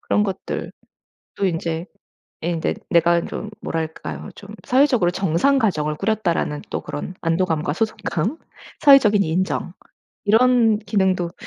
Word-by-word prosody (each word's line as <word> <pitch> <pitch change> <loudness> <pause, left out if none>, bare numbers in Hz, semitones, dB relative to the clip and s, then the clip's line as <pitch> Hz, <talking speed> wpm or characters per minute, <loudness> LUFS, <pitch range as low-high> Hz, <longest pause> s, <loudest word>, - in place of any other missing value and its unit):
그런 210 - +1
것들도 195 -2 -4 0.7
인제 165 -2 -1 0.6
예 170 - 0
인제 165 -2 -1 0.2
내가 170 0 +4
좀 215 - -6
뭐랄까요? 115 - -5
좀 200 - -12 0.2
'사회적으로 250 -8 +3
정상 190 - +2
가정을 155 -10 0
꾸렸다.'라는 175 -9 -1
또 - - -2
그런 160 +5 -6
안도감과 165 -3 0
소속감. 215 - -2 0.4
사회적인 225 -8 +6
인정 175 +1 -1 0.5
이런 225 0 +4
기능도 190 -4 0
185 Hz, 285 characters per minute, -21 LUFS, 165-220 Hz, 0.7 s, 사회적인